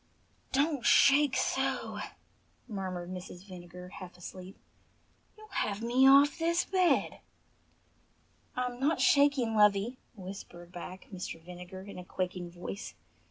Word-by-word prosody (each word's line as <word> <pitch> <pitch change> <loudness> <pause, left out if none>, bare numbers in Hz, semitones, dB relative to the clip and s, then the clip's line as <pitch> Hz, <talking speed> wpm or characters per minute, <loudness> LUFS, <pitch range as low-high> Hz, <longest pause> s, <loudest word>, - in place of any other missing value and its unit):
"Don't 285 -1 +1
shake 280 +2 +6
so!" 265 -1 -1 0.7
murmured 185 -5 -4
Mrs. 180 0 -8
Vinegar, 180 -1 -10
half 180 -2 -10
asleep. 185 +1 -9 0.8
"You'll 430 0 -13
have 215 - -2
me 255 +3 +5
off 280 +3 +6
the 340 +1 +2
bed." 370 -2 +2 1.4
"I'm 250 -1 -2
not 295 +5 +2
shaking, 280 -5 +4
lovey," 210 +3 +4 0.2
whispered 180 -3 -9
back 180 +1 -8
Mr. 180 -3 -5
Vinegar 180 +2 -9
in 200 -2 -9
a - - -7
quaking 180 -1 -4
voice. 180 +4 -7
200 Hz, 115 wpm, -31 LUFS, 180-270 Hz, 1.4 s, shake